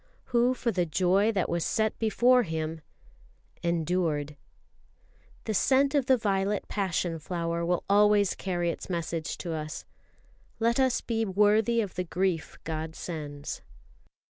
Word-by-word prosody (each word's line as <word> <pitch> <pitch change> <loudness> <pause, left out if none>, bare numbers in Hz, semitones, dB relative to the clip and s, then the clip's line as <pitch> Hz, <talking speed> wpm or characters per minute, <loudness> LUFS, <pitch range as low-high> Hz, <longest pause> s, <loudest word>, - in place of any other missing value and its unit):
"Who 245 +2 +3
for 240 -2 -1
the 180 -4 0
joy 185 +6 +2
that 190 - 0
was 170 -1 -1
set 220 +4 0
before 245 +3 +4
Him... 160 -4 -3 0.8
endured." 165 -3 0 1.1
The 220 - -2
scent 270 +7 +3
of 280 -4 +1
the 260 - +5
violet 200 -2 0
passion 180 -4 -1
flower 170 +1 -2
will 175 0 0
always 205 0 +4
carry 175 -3 -1
its - - -8
message 170 -2 -3
to 170 -2 -4
us. 155 0 -5 0.7
"Let 235 +2 +2
us 260 -2 +2
be 225 -1 -1
worthy 210 +3 +3
of 200 -4 -4
the 180 - -2
grief 180 -1 -2
God 160 0 -4
sends." 145 -4 -6
185 Hz, 140 wpm, -28 LUFS, 165-220 Hz, 1.1 s, the